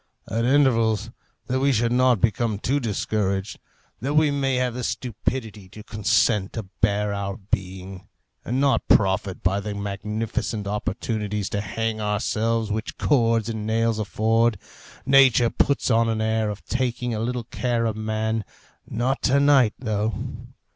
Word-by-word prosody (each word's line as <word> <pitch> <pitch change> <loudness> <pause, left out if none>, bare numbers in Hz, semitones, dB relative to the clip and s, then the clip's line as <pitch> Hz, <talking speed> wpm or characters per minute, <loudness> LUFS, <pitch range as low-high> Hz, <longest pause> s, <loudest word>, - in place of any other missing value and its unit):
At 115 +3 -1
intervals, 115 -5 +2 0.3
that 130 +1 -1
we 140 +1 +3
should 115 -1 +1
not 125 -2 +3
become 115 -1 +1
too 135 +7 0
discouraged, 105 -4 -2 0.4
that 140 +5 -2
we 155 -1 +4
may 135 -2 0
have 125 -1 0
the 125 +1 -5
stupidity 110 -2 -3
to 105 +3 -11
consent 105 -1 +1
to 110 - -4 0.2
bear 105 -1 +1
our 100 -1 -3
being, 95 -1 -5 0.4
and 125 +3 -1
not 140 0 +2
profit 95 -1 +2
by 95 +2 +2
the 105 0 -5
magnificent 105 +2 -3
opportunities 105 0 -2
to 100 - -1
hang 115 0 -3
ourselves 110 +1 0
which 110 +2 -4
cords 115 -6 +2
and 110 -2 -4
nails 115 0 +1
afford, 110 +2 +1 0.5
nature 130 -3 +5
puts 140 -2 +1
on 115 0 +3
an 110 -1 -1
air 110 0 0
of 105 -1 -7
taking 125 -1 -1
a 110 - -2
little 120 +1 -2
care 120 0 -1
of 110 -2 -1
man 110 0 -1 0.4
not 125 +4 -1
to 140 +1 +3
night, 140 -6 +4
though. 110 -3 -1
110 Hz, 150 wpm, -24 LUFS, 105-120 Hz, 0.5 s, nature